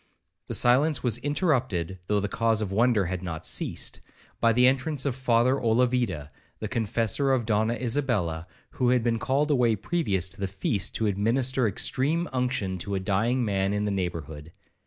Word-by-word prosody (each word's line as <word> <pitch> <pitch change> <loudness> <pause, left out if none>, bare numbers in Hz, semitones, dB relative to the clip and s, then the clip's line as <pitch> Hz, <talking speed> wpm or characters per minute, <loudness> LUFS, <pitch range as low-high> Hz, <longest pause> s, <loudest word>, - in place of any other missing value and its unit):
The - - -3
silence 135 +4 +3
was 120 -2 0
interrupted, 130 - -1
though 105 -1 +1
the 100 - -2
cause 115 +1 +1
of 105 -3 -3
wonder 110 -1 +2
had 90 0 -3
not 85 -3 -5
ceased, - - 0 0.4
by 115 - +4
the 125 +2 +4
entrance 135 +2 +1
of 135 -4 -1
Father 130 0 +2
Olavida, 115 - 0 0.3
the 110 - -4
Confessor 115 +4 0
of 125 -4 +1
Donna 110 +1 +1
Isabella, 115 - -1 0.2
who 125 -1 0
had 125 -2 +2
been 115 -1 0
called 140 +5 0
away 120 -5 +3
previous 105 - -1
to 95 +2 -9
the 100 - -1
feast, 95 +1 -1
to 110 - 0
administer 120 +5 +1
extreme 145 - 0
unction 125 -8 -1
to 100 +3 -3
a - - 0
dying 115 +6 0
man 100 -1 0
in 105 0 -1
the 105 - -1
neighbourhood. 85 -5 -4
115 Hz, 175 wpm, -26 LUFS, 95-130 Hz, 0.4 s, by